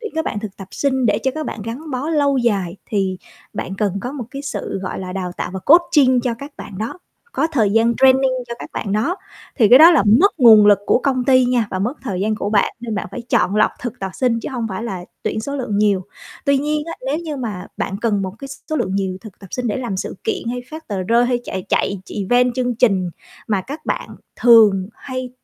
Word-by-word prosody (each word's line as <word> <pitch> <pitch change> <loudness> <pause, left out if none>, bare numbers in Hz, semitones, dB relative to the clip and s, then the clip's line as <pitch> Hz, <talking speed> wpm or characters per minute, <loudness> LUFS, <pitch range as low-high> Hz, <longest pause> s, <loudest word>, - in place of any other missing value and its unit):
tuyển 445 -2 -6
các 320 - -1
bạn 205 - -3
thực 210 -3 -7
tập 195 -1 -10
sinh 265 -3 0
để - - +2
cho 265 - 0
các 310 -1 -4
bạn 215 - -5
gắn 250 +9 -6
bó 265 +3 -3
lâu 285 -4 +2
dài 200 -7 0
thì 195 -3 -1 0.3
bạn 190 - -4
cần 200 -1 -1
có 250 +5 -5
một 270 -5 -5
cái 275 +2 -6
sự, 275 -7 -4
gọi 185 - -4
là, 185 -1 -6
đào 180 -2 -4
tạo - - -3
và - - -2
coaching 280 - +5
cho 240 -1 -1
các 280 +5 -10
bạn 195 -2 -9
đó. 225 +11 -4 0.4
Có 315 - +2
thời 220 -8 +2
gian 230 +2 +3
training 265 0 +5 0.2
cho 235 - -4
các - - -9
bạn 200 - -3
đó 225 - 0 0.4
thì 225 -6 +5
cái 250 +4 +9
đó 325 +2 +10
là 330 - +4 0.2
mất 395 -5 +3
nguồn 220 -4 +8
lực 205 -1 +6
của - - +4
công 255 -3 0
ty 260 -2 +5
nha, 245 -3 +1
và 185 - -2
mất 230 +8 -1
thời 195 -8 -3
gian 215 +2 0
của 205 -1 -3
bạn 210 -2 +2
nên 230 -2 -4
bạn 200 - -3
phải 245 - -6
chọn 190 0 +2
lọc 215 - +4
thực 245 -1 -5
tập 195 -1 -3
sinh 235 -3 +1
chứ - - -5
hông 240 -3 -2
phải 190 +1 -5
là 190 -6 -5 0.2
tuyển 220 - -2
số 280 +5 -4
lượng 230 -6 -2
nhiều. 205 -3 +2 0.4
Tuy 280 -1 +3
nhiên 300 +2 -1
á, 330 - -4
nếu 290 +3 0
như 320 -3 -5
mà 215 -8 -5
bạn 195 - -3
cần 210 -4 +1
một 190 0 -4
cái 275 - -8
s 275 - -9
số 310 - 0
lượng 190 -7 -1
nhiều 190 -2 -1
thực 215 -3 -13
tập 195 - -12
sinh 250 -1 -3
để 215 - -1
làm 240 -7 -3
sự - - -5
kiện 390 - -2
hay 245 0 -4
phát 315 +1 -9
tờ 200 -3 -2
rơi 235 +6 +3
hay 245 -1 0
chạy 185 -1 -5
chạy 200 -2 0
ch - - -12
event 245 +5 +2
chương 250 -1 -1
trình 195 -7 +2 0.4
mà 205 -3 +1
các 280 - -9
bạn - - -2 0.3
thường 215 -6 +6
hay 255 -2 -6
235 Hz, 255 wpm, -19 LUFS, 200-265 Hz, 0.4 s, đó